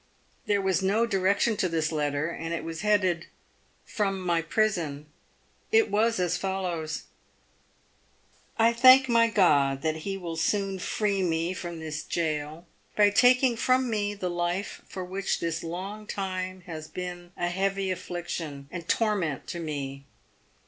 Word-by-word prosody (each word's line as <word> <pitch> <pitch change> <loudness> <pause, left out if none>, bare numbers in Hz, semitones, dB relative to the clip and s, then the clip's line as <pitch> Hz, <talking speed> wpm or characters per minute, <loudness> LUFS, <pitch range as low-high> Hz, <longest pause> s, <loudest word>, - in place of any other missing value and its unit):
There 200 -1 +2
was 190 0 +1
no 205 +5 +2
direction 200 +2 +2
to 185 - +1
this 160 -1 0
letter, 150 +1 -1
and 165 0 -4
it - - -4
was 165 0 -5
headed, 185 -5 +2 0.3
" - - -38
From 195 -3 +1
my 175 -2 +1
prison." 165 -6 0 0.7
It 445 0 +4
was 225 +1 +2
as 180 -2 +1
follows: 175 -5 -3 0.7
— - - -36
11 230 +1 +5
1 235 - -12
thank 260 +1 +9
my 230 -1 +5
God 140 -10 +3
that 160 0 0
he 195 +5 -4
will 170 -3 -5
soon 195 +2 0
free 200 +1 0
me 170 0 0
from 170 -2 -6
this 155 -1 -4
gaol, 155 0 -3 0.3
by 205 -1 +5
taking 250 +2 +5
from 255 +1 +2
me 205 -1 -1
the 190 -2 -3
life 175 +3 -2
which 190 +1 -2
for - - -7
this 165 -1 -2
long 195 +6 -6
time 185 -2 -4
has 160 -3 -8
been 175 0 -7
a 175 - 0
heavy 195 +1 0
affliction 165 -6 -5
and 170 -2 -7
torment 200 - 0
to 170 - -4
me. 140 -4 -5
185 Hz, 155 wpm, -27 LUFS, 165-205 Hz, 0.7 s, thank